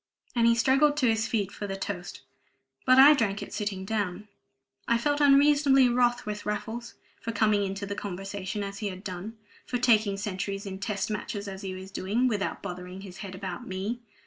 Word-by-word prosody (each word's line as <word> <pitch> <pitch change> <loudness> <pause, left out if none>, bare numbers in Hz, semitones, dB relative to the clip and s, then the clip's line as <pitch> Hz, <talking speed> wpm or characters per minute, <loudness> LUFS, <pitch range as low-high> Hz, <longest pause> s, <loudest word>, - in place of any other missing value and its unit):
And 235 -1 +4
he 235 - +5
struggled 270 +5 +3
to 260 -4 +3
his 220 -1 +2
feet 205 -4 -1
for 205 - -6
the 195 - -3
toast; 195 -2 -5 0.7
but 255 0 +7
I 280 +3 +10
drank 210 -8 0
it - - -10
sitting 205 -3 -3
down. 205 -1 -2 0.6
I 235 - +3
felt 290 +4 0
unreasonably 280 -2 +6
wroth 240 0 +2
with 210 -1 -4
Raffles, 220 +3 -4 0.2
for 230 - -4
coming 210 -1 +2
into 195 +1 -3
the 200 - -4
conversation 195 +1 -4
as 200 0 -6
he 210 - -2
had 185 -1 -7
done 200 +4 -6 0.3
for 250 - -1
taking 220 -5 +3
centuries 200 0 -3
in 190 -1 -6
Test 200 0 -2
Matches 205 -1 -4
as 190 -1 -6
he 190 -2 -5
was 190 +1 -9
doing, 205 +7 0
without 205 -4 -2
bothering 180 +1 -7
his 190 -2 -10
head 195 -2 -7
about 185 -2 -6
me. 195 +6 -3
205 Hz, 195 wpm, -28 LUFS, 195-235 Hz, 0.7 s, I